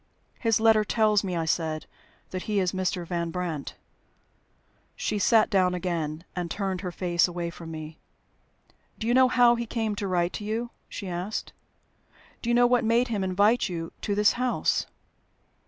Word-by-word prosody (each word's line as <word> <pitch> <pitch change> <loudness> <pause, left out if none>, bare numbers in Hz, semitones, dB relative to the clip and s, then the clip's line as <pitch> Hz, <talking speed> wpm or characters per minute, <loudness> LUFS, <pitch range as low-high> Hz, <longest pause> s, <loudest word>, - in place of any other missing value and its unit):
"His 225 -3 +2
letter 220 -1 +5
tells 215 0 +2
me," 185 -2 -2
I 165 -1 -1
said, 160 -1 -1 0.5
"that 185 - -3
he 210 -1 +2
is 185 -2 +1
Mr. 185 -2 -2
Van 170 -1 -2
Brandt." 170 -5 -4 1.2
She 210 - -2
sat 220 +2 +4
down 185 -2 +3
again, 165 -3 -3
and 175 -2 -3
turned 190 -1 -2
her 180 -3 -4
face 175 0 +1
away 175 -1 -4
from 170 -1 -10
me. 155 0 -8 1.0
"Do 220 - -5
you 235 - +2
know 260 0 +6
how 245 -1 +5
he 235 0 -3
came 220 -2 -2
to 200 - -2
write 175 -1 0
to 210 - -5
you?" 225 +3 -3 0.2
she 200 - -6
asked. 180 +4 -4 0.9
"Do 235 - -3
you 240 - +3
know 245 0 +6
what 245 0 +3
made 235 +3 +2
him 210 -4 -1
invite 205 +5 +2
you 165 -2 -5
to 205 - -1
this 210 0 +5
house?" 250 -1 +1
190 Hz, 175 wpm, -27 LUFS, 175-220 Hz, 1.2 s, know